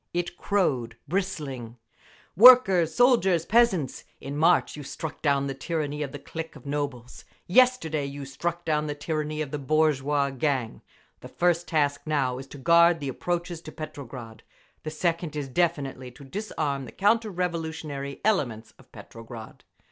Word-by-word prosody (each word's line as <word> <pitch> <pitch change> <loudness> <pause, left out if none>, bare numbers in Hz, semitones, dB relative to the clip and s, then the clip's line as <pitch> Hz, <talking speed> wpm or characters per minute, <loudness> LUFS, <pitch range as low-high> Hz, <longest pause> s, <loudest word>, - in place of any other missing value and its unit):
It 175 0 -2
crowed, 140 - 0
bristling: 145 - -3 0.6
Workers, 195 -6 +7
soldiers, 195 -9 +4
peasants! 205 - +2 0.2
In 140 +1 -6
March 165 +4 +3
you 150 - -7
struck 155 +3 -7
down 140 -2 +2
the 135 - -3
tyranny 150 +1 -3
of 140 -3 -3
the 145 - -6
clique 165 +3 -7
of - - -14
nobles. 140 -4 -4 0.2
Yesterday 180 - +3
you 140 0 -6
struck 170 +5 -4
down 150 -1 0
the 145 - -3
tyranny 155 0 -2
of 140 - -9
the 150 - -3
bourgeois 145 -1 +1
gang…. 135 -4 -2 0.4
The - - -10
first 175 0 +1
task 145 -3 +1
now 135 -4 0
is 135 - -9
to 145 - -11
guard 170 +3 +5
the 140 -2 -4
approaches 175 +4 -3
to 155 - -9
Petrograd. 125 -7 -9 0.4
The 155 - -5
second 165 0 -2
is 145 -2 -3
definitely 135 -4 -1
to 140 - -14
disarm 140 -4 -3
the - - -10
counter 220 +2 +2
revolutionary 160 -6 -4
elements 120 - 0
of - - -20
Petrograd. 115 -1 -11
150 Hz, 155 wpm, -26 LUFS, 140-175 Hz, 0.6 s, Workers